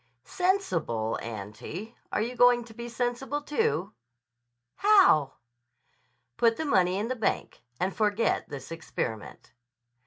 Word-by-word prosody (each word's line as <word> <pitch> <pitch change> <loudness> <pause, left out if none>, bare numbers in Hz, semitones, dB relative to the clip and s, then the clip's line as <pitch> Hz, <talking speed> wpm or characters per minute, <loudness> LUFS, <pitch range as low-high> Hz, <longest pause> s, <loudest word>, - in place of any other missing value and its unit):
"Sensible 360 - 0
auntie! 115 - -7 0.2
Are - - +1
you 245 +2 -4
going 245 0 +5
to 230 -1 -14
be 235 +1 -7
sensible 245 +4 -2
too?" 300 - -1 0.8
"How?" 385 - +5 1.0
"Put 230 -1 +3
the 315 - -2
money 185 -9 +3
in 210 +3 -1
the 255 - -2
bank. 220 -4 -2 0.2
And 185 +1 -1
forget 210 +1 +1
this 140 0 -8
experiment." 115 -9 -5
225 Hz, 120 wpm, -28 LUFS, 155-255 Hz, 1.0 s, going